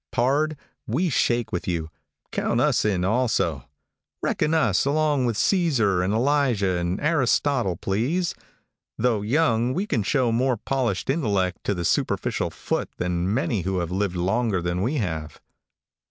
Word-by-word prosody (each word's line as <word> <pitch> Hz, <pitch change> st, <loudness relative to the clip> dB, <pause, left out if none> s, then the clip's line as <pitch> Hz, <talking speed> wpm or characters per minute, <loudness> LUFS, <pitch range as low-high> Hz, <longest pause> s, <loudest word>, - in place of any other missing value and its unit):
Pard, 140 Hz, +5 st, +1 dB, 0.3 s
we 160 Hz, +10 st, 0 dB
shake 120 Hz, -2 st, +1 dB
with 90 Hz, -, -3 dB
you. 80 Hz, -3 st, -2 dB, 0.4 s
Count -, -, 0 dB
us -, -, +2 dB
in 95 Hz, -4 st, +1 dB
also. 95 Hz, -, 0 dB, 0.5 s
Reckon 150 Hz, -, 0 dB
us 110 Hz, -, +2 dB
along 145 Hz, -2 st, +1 dB
with 115 Hz, -, -1 dB
Cæsar, 115 Hz, -, +2 dB
and 95 Hz, -, 0 dB
Elijah, 120 Hz, -6 st, +2 dB
and 85 Hz, +3 st, -2 dB
Aristotle, 140 Hz, -, +1 dB
please. 135 Hz, -, -1 dB, 0.6 s
Though 115 Hz, -3 st, +1 dB
young, 120 Hz, 0 st, +1 dB
we 190 Hz, +4 st, 0 dB
can 120 Hz, -, 0 dB
show 125 Hz, +3 st, +1 dB
more 125 Hz, +1 st, +1 dB
polished 120 Hz, -5 st, -1 dB
intellect 100 Hz, -, 0 dB
to 100 Hz, -, 0 dB
the 85 Hz, -1 st, -3 dB
superficial -, -, 0 dB
foot -, -, -3 dB
than 90 Hz, +1 st, -1 dB
many 115 Hz, -3 st, 0 dB
who 95 Hz, +2 st, -2 dB
have 85 Hz, -1 st, -2 dB
lived 95 Hz, 0 st, -1 dB
longer 95 Hz, +3 st, 0 dB
than 85 Hz, +1 st, -2 dB
we 125 Hz, +9 st, 0 dB
have. 80 Hz, -, -3 dB
115 Hz, 150 wpm, -24 LUFS, 95-135 Hz, 0.6 s, us